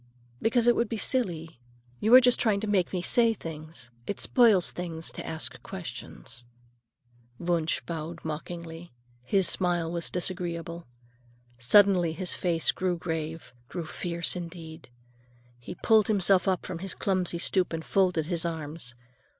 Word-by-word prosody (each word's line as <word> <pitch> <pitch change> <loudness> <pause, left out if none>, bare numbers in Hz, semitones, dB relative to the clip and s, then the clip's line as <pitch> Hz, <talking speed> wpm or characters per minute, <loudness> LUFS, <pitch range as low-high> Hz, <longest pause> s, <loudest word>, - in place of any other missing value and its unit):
"Because 230 +1 +2
it 240 0 +5
would 235 -2 0
be 225 - -2
silly. 170 - -2 0.4
You 220 - +1
are 255 - +10
just 245 -1 +4
trying 215 -4 +2
to 215 - -3
make 195 -4 +1
me 180 -2 -2
say 230 +3 +3
things. 155 - -8 0.2
It 200 - -3
spoils 225 -8 +4
things 165 -2 -4
to - - -7
ask 160 0 -1
questions." 170 -8 -7 0.9
Wunsch 170 -2 0
bowed 165 0 -6
mockingly; 165 +2 -6 0.3
his 185 +9 +2
smile 175 -3 +1
was 170 -1 -3
disagreeable. 170 -2 -4 0.7
Suddenly 180 +4 +5
his 180 +1 0
face 170 -3 +1
grew 185 -1 -1
grave, 160 -2 -5 0.2
grew 175 -3 -5
fierce, 170 +2 -1
indeed. 165 -4 -8 0.7
He 120 +9 -8
pulled 215 +2 +4
himself 195 -2 +3
up 185 -2 0
from 165 - -5
his 195 +1 -3
clumsy 185 -3 0
stoop 185 +1 +1
and 160 -1 -4
folded 180 -5 +2
his 170 0 0
arms. 155 -6 -5
175 Hz, 145 wpm, -28 LUFS, 165-195 Hz, 0.9 s, are